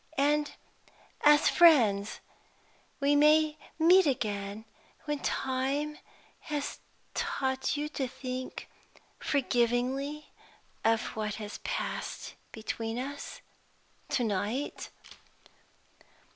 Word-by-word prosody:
"And 295 +1 +2 0.7
as 295 0 +7
friends 225 - +5 0.8
we 285 +1 +3
may 305 +1 +5 0.2
meet 345 +2 +6
again, 210 -4 -2 0.4
when 295 -1 -2
time 275 +4 -1 0.4
has 295 -2 -4 0.3
taught 265 +1 -1
you 295 +1 -1
to 275 -3 -2
think 255 0 -6 0.5
forgivingly 265 +3 0 0.5
of 225 0 +3
what 215 -1 -2
has 210 -1 -7
passed - - -4 0.2
between 225 +1 -4
us, 280 +3 -6 0.7
to 250 - +1
night." 215 +6 -2
265 Hz, 85 wpm, -30 LUFS, 225-295 Hz, 0.8 s, as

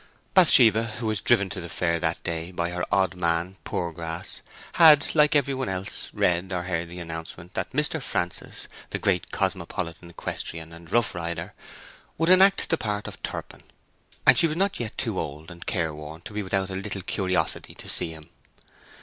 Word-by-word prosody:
Bathsheba—who 115 - +6
was 110 -3 +1
driven 110 -5 +4
to 90 - -4
the 85 - -7
fair 85 0 0
that 80 0 -2
day 85 0 -3
by 85 -1 -2
her 90 0 -3
odd 95 -1 +3
man 85 +1 -1
Poorgrass—had, 85 - +2
like 150 -1 +4
every 140 -1 +3
one 130 -5 -2
else, 95 0 -3
read 90 +2 +1
or 90 -1 -1
heard 85 -2 -2
the 90 - -9
announcement 85 0 -7
that - - -3
Mr. 150 +3 +1
Francis, 90 -8 -3 0.2
the - - -2
Great 90 -3 0
Cosmopolitan 90 -3 -2
Equestrian 80 -1 -3
and 85 0 -13
Roughrider, 85 -6 -1 0.7
would 165 +3 +3
enact 195 +1 +6
the 165 - +2
part 105 -2 -2
of - - -9
Turpin, - - -5 0.6
and - - +7
she 165 - +5
was 155 0 -3
not 195 +1 +1
yet 115 -3 -4
too - - -1
old 75 +4 -6
and 85 0 -11
careworn 80 -2 -3
to 105 - -9
be 105 - -2
without 95 0 -1
a - - -3
little 95 0 -4
curiosity 95 -1 -1
to - - -11
see - - 0
him. 80 -1 -10
90 Hz, 175 wpm, -26 LUFS, 85-110 Hz, 0.7 s, and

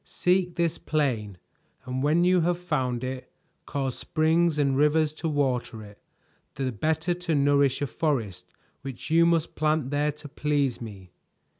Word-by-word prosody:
"Seek 180 -1 0
this 170 -1 0
plain, 120 -11 -1 0.5
and 130 +1 -3
when 155 +5 +3
you 180 0 +4
have 175 +1 +1
found 130 -8 -2
it, 130 0 -5 0.4
cause 135 -3 -2
springs 160 +1 +1
and 140 -2 +2
rivers 150 +2 +3
to 160 +1 -3
water 130 -6 -1
it, 105 -1 -14 0.5
the 135 -2 -2
better 160 - 0
to 175 -2 -2
nourish 140 -1 +3
a - - +2
forest 110 - -2 0.3
which 135 +2 -7
you 170 +1 +5
must 165 -2 +1
plant 155 -3 0
there 145 +1 +1
to 150 0 -10
please 145 -3 -1
me. 100 -6 -9
145 Hz, 155 wpm, -26 LUFS, 130-160 Hz, 0.5 s, you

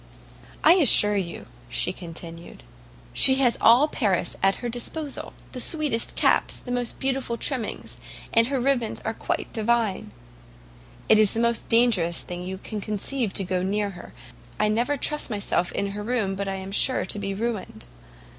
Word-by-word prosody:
"I 320 - +8
assure 210 - +7
you," 180 -4 -4 0.2
she 180 - 0
continued, 170 -1 -10 0.5
"she 265 - +7
has 255 -4 +2
all 245 +6 +6
Paris 205 - -1
in 195 0 +4
her 245 - -6
disposal; 270 +5 -5 0.2
the 255 - -7
sweetest 295 -5 +1
caps! - - +2
the 245 - -8
most 245 -1 -2
beautiful 265 -3 -2
trimmings! 250 -5 -4 0.3
and 230 0 +4
her 270 0 -1
ribbons 245 -3 -1
are 220 - -3
quite - - -4
divine! 220 - -1 1.0
It 215 - +5
is 215 -2 +4
the - - -1
most 235 0 0
dangerous 215 -8 +2
thing 175 0 -6
you 190 +1 -5
can 210 +2 -7
conceive 215 +3 -2
to 195 - 0
go 185 0 -1
near 200 +2 -1
her; 175 -2 -12 0.5
I 210 - +2
never 240 +7 0
trust 300 +2 0
myself 200 -4 -1
in 200 0 -3
her 205 +1 -6
room 215 -3 -1
but 200 +1 -4
I 195 - -2
am 190 0 -7
sure 255 +4 +2
to 205 - -3
be 195 -1 -4
ruined. 215 - -5
215 Hz, 170 wpm, -24 LUFS, 195-245 Hz, 1.0 s, I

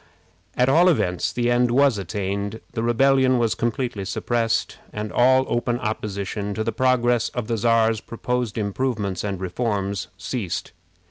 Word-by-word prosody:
At 125 - +3
all 165 +7 +5
events, 90 - 0
the 120 0 0
end 120 0 +3
was 130 -2 +3
attained. 100 +3 -3
The 115 - -2
rebellion 130 +2 +3
was 115 -2 +1
completely 120 -3 -2
suppressed, 115 +3 -1
and 105 0 -5
all 130 +2 +4
open 120 0 0
opposition 105 -3 -3
to 110 - -1
the 115 - -1
progress 120 -2 +2
of 125 -3 -2
the 115 +1 -1
Czar's 115 0 +2
proposed 120 -1 -3
improvements 105 -3 -2
and 100 -3 -3
reforms 100 0 -2
ceased. 110 -4 -4
115 Hz, 145 wpm, -23 LUFS, 100-125 Hz, -, all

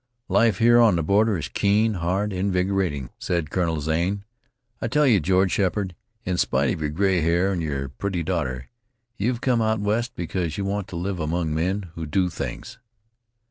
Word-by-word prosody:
"Life 115 -5 +3
here 120 +3 +5
on 115 -5 +5
the 85 - 0
border 105 +4 +3
is 75 -4 -4
keen, 105 - +2
hard, 95 +3 -1
invigorating," 90 -7 -1
said 85 -4 -2
Colonel 85 -4 0
Zane. 85 +6 -1 0.6
"I - - -1
tell 150 +6 +2
you, 115 -7 +5
George 95 +3 +2
Sheppard, 95 -1 0 0.3
in 90 -1 -1
spite 70 0 +2
of 80 - -6
your 75 - 0
gray 95 +3 +1
hair 85 +4 +2
and 90 -3 -1
your 70 -4 -3
pretty 90 +6 -3
daughter, 65 -8 -2 0.5
you 100 - -1
have 125 -1 -1
come 125 -3 +2
out 110 0 +1
West 115 +4 -1
because 85 -2 -3
you 100 - -2
want 100 0 -2
to 95 - -8
live 90 +2 -3
among 80 0 -1
men 90 +3 -1
who 80 -2 -6
do 90 +4 +1
things." - - -6
90 Hz, 185 wpm, -24 LUFS, 80-100 Hz, 0.6 s, here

